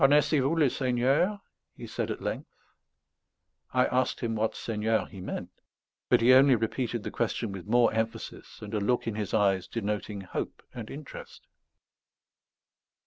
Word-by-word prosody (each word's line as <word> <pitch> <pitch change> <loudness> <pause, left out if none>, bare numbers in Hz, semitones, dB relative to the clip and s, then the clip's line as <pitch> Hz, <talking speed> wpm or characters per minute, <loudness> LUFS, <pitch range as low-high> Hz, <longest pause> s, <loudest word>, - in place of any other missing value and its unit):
"Connaissez 145 +2 +5
vous 135 +5 +1
le 155 -3 +4
Seigneur?" 135 +11 +1 0.4
he - - -7
said - - -3
at - - -4
length. - - -3 1.2
I 125 0 +3
asked 130 0 0
him 115 -1 -1
what 110 0 0
Seigneur 110 0 0
he 95 -3 -10
meant; - - -5 0.6
but - - +5
he 125 +2 +7
only 135 0 +7
repeated 115 0 -2
the - - -4
question 110 - -1
with 95 -1 -8
more 120 +1 +4
emphasis 110 -1 -4
and 105 +1 -7
a 105 - +1
look 120 +5 +1
in 115 - -2
his 105 -3 -3
eyes 95 -3 +2
denoting 105 -2 -3
hope 95 - -5
and 115 -4 -7
interest. 145 +1 -10
115 Hz, 155 wpm, -29 LUFS, 105-130 Hz, 1.2 s, he